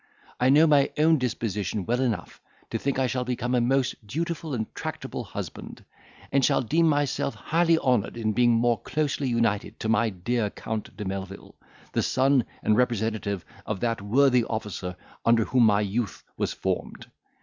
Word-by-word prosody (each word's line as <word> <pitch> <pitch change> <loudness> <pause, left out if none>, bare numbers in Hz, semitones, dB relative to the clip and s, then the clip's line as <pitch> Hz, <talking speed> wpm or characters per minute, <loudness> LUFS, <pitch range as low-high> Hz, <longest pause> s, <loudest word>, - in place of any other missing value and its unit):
I 125 - +3
know 150 +4 +7
my 145 -3 +4
own 160 0 +4
disposition 105 -5 -2
well 120 +2 0
enough 120 -5 -2 0.3
to 115 - -1
think 140 +2 -1
I 130 - +2
shall 125 0 -1
become 125 0 -2
a 125 - +3
most 130 +2 +2
dutiful 160 - -3
and 110 -2 -1
tractable - - -5
husband; - - -8 0.5
and 140 -1 +3
shall 130 - +3
deem 160 +8 +3
myself 145 -2 0
highly 165 +1 +2
honoured 125 -8 +1
in 110 -2 0
being 120 +2 +4
more 115 0 +2
closely 145 -2 -1
united 115 -4 0
to 110 - -2
my 115 0 +3
dear 105 +3 -1
Count 110 -1 -6
de 105 - -5
Melvil, 95 0 -6 0.4
the - - +2
son 130 -1 +2 0.2
and 105 - +3
representative 110 -6 0 0.2
of 105 -3 -2
that 115 -3 0
worthy 125 +4 +4
officer 105 -5 -4 0.3
under 115 -1 +4
whom 125 -3 +4
my 105 -1 +3
youth 105 +2 -2
was - - -1
formed. - - -3
120 Hz, 170 wpm, -26 LUFS, 110-135 Hz, 0.5 s, know